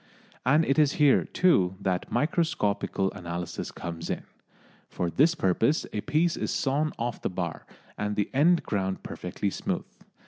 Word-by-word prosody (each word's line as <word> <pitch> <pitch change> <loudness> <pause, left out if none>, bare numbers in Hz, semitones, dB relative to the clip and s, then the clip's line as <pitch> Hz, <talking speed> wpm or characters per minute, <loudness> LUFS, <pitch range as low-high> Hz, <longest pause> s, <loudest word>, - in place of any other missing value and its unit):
And 150 +5 +5
it 140 +3 +2
is 145 -2 +4
here, 145 -2 +4
too, 95 - +3
that 95 -2 -2
microscopical 145 - 0
analysis 85 -2 -5
comes 85 -1 -6
in. - - -2 0.7
For 85 -1 -2
this 160 - +4
purpose 115 - +2
a 105 - -1
piece 160 +6 +1
is - - -3
sawn 150 +2 0
off 120 0 -3
the - - -1
bar, 90 -3 -4 0.3
and 105 0 -1
the 105 -1 -1
end 165 +6 +4
ground 95 -2 -2
perfectly 95 +2 -3
smooth. - - -3
105 Hz, 150 wpm, -27 LUFS, 95-150 Hz, 0.7 s, And